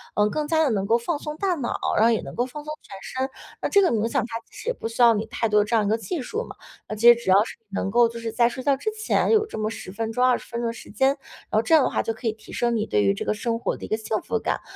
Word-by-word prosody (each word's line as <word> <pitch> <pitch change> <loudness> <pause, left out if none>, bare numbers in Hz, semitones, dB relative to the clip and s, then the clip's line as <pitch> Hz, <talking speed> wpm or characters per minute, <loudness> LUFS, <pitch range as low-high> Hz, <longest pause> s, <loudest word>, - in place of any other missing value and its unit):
呃， 210 0 +3
更 300 +5 -2
加 320 0 +3
地 295 - +2
能 195 -3 0
够 225 +3 +3
放 290 +7 -2
松 300 0 -5
大 380 -1 0
脑， 270 -7 -3 0.2
然 215 - +4
后 235 - +5
也 225 - +1
能 - - -9
够 245 - +1
放 295 +4 -8
松 305 0 -5
全 195 - -11
身。 260 +1 -3 0.3
那 - - -1
这 400 - +5
个 365 - +3
冥 225 -1 +1
想 - - +1
它 230 -1 -5
其 - - -29
实 - - -5
也 - - +1
不 355 - -5
需 230 +2 -3
要 235 -1 +8
你 215 0 -2
太 230 - -1
多 210 0 +4
的 - - 0
这 230 - 0
样 215 -2 +3
一 - - 0
个 220 - +2
技 305 +8 -4
术 440 - -3
嘛， - - -10 0.3
那 215 - -3
其 225 +3 +3
实 - - -5
只 235 -4 -5
要 195 +2 +6
是 - - -9
能 195 0 -2
够 240 +2 +5
就 235 0 -8
是 230 -1 -4
在 235 +1 +3
睡 255 +2 -7
觉 280 0 +3
之 435 +11 -2
前 430 0 0
有 435 -1 +4
这 430 - -8
么 215 0 -1
10 220 -4 -8
分 225 +3 -3
钟、 250 +3 +2
20 255 -1 +1
分 235 - -4
钟 235 - -1
的 230 - -2
时 230 - -12
间， 265 +6 +3
然 280 - -1 0.3
后 215 - +3
这 320 - +4
样 305 - +6
的 - - +1
话， - - 0
就 225 - -2
可 225 +2 -5
以 220 - +1
提 220 - -15
升 240 -1 +1
你 215 -1 0
对 105 - +1
于 100 0 +3
这 100 - -4
个 - - +1
生 230 +2 -2
活 - - -2
的 - - -8
一 - - -8
个 215 - 0
幸 220 0 -2
福 225 - -2
感， - - -2
235 Hz, 370 characters per minute, -24 LUFS, 220-275 Hz, 0.3 s, 要